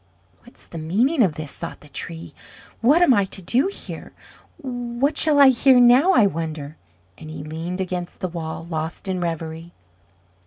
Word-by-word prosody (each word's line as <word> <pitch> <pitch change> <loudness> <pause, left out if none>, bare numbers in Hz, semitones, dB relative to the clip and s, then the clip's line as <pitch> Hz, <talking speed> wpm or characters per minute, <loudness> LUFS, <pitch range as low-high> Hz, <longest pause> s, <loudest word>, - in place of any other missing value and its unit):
"What's - - -14
the 165 - -8
meaning 235 - +1
of 180 -9 +2
this?" 155 -2 -7
thought - - -7
the - - -15
Tree. 85 +1 -7 0.5
"What 290 +9 +5
am 325 - +5
I 200 - +3
to 190 - -8
do 240 - +1
here? 400 - -8 0.4
What 245 +2 -2
shall 295 -1 +3
I 280 -1 +9
hear 260 0 +5
now, 250 +10 +6
I 230 - +5
wonder?" 155 -4 -4 0.4
And 155 - -10
he 155 -2 -7
leaned 165 +4 -5
against 180 -2 -4
the 185 - -2
wall, 165 -2 -6
lost 160 +2 -5
in 185 -1 -2
reverie. 165 0 -5
185 Hz, 170 wpm, -22 LUFS, 160-250 Hz, 0.5 s, I